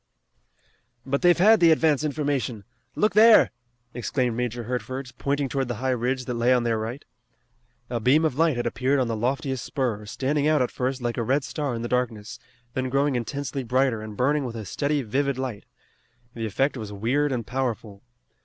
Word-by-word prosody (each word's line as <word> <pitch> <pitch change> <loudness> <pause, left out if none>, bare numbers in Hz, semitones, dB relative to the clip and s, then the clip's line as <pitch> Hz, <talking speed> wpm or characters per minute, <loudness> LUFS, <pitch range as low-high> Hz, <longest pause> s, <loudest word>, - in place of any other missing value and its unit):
"But 140 +1 -1
they've 175 -1 +5
had 215 +5 +6
the 170 - +6
advance 155 -2 +3
information! 140 -7 -2 0.3
Look 210 - +2
there!" 220 +1 +7 0.4
exclaimed 120 0 -1
Major 120 0 -2
Hertford, 130 +2 -4
pointing 140 0 0
toward 135 -1 -2
the 120 - -3
high 130 +4 -1
ridge 125 +1 -1
that 125 - -3
lay 120 +1 +2
on 125 - +1
their 115 -2 0
right. 115 +5 -5 0.8
A 120 -1 -2
beam 140 +8 +3
of 155 - +1
light 160 +1 +2
had 120 - -2
appeared 130 +4 +1
on 130 - +1
the 115 - -2
loftiest 130 +3 -2
spur, 115 -6 -2
standing 140 +6 0
out 155 -1 +3
at 125 - -3
first 130 0 -2
like 120 -1 -2
a 120 - 0
red 135 +5 +1
star 145 -3 -3
in 115 - -4
the - - -2
darkness, 120 -3 -2 0.3
then 130 0 -2
growing 140 +1 +1
intensely 135 +3 -3
brighter, 125 -1 +1
and 110 -1 -8
burning 145 +3 +2
with 120 -3 -5
a 110 -2 -6
steady, 140 +7 -1
vivid 135 +4 -1
light. 130 -6 -4 0.7
The 115 -1 -3
effect 135 +7 0
was 110 -3 -6
weird 125 +8 0
and 120 -4 -2
powerful. 120 -5 -3
130 Hz, 190 wpm, -25 LUFS, 120-140 Hz, 0.8 s, there